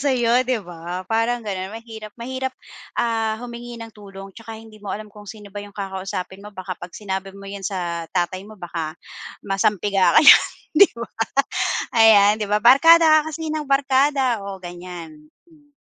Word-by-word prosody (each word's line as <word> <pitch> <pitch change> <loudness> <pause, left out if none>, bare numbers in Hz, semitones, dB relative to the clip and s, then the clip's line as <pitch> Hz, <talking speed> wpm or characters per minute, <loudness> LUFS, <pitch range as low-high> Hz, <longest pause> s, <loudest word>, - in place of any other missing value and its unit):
sa'yo 255 -2 +2
'di 230 -6 -1
ba? 175 +1 -7
Parang 230 +3 -1
gano'n 190 -2 -4
mahirap 220 -2 -10
mahirap, 260 +2 -4 0.4
ah, 225 -2 0
humingi 240 0 -8
ng 230 -1 -9
tulong 195 -1 -12
tsaka 225 +1 -10
hindi 220 -1 -14
mo 205 - -9
alam 210 +1 -6
kung 205 -1 -13
sino 205 0 -11
ba 205 - -6
yung 205 0 -12
kakausapin 190 -1 -5
mo 205 - -10
baka 185 0 -5
pag 175 - -7
sinabi 195 -1 -5
mo 200 - -12
'yan 200 0 -7
sa 175 -3 -4
tatay 185 +3 -2
mo 215 - -13
baka 165 -3 -5 0.5
masampiga 195 -2 +1
ka - - +9
niyan, - - +9 0.3
'di 400 - +9
ba? 235 - -6 0.9
Ayan 210 -2 +7
di 210 - -2
ba, 210 +1 +2
"Barkada 315 +5 +7
ka 315 - -6
kasi 320 0 -5
ng 310 -1 -3
barkada." 275 -2 +2
Oh, 195 -1 -7
ganyan, 175 -3 -10 0.2
hmm. 290 -2 -24
210 Hz, 175 wpm, -21 LUFS, 190-240 Hz, 0.9 s, ka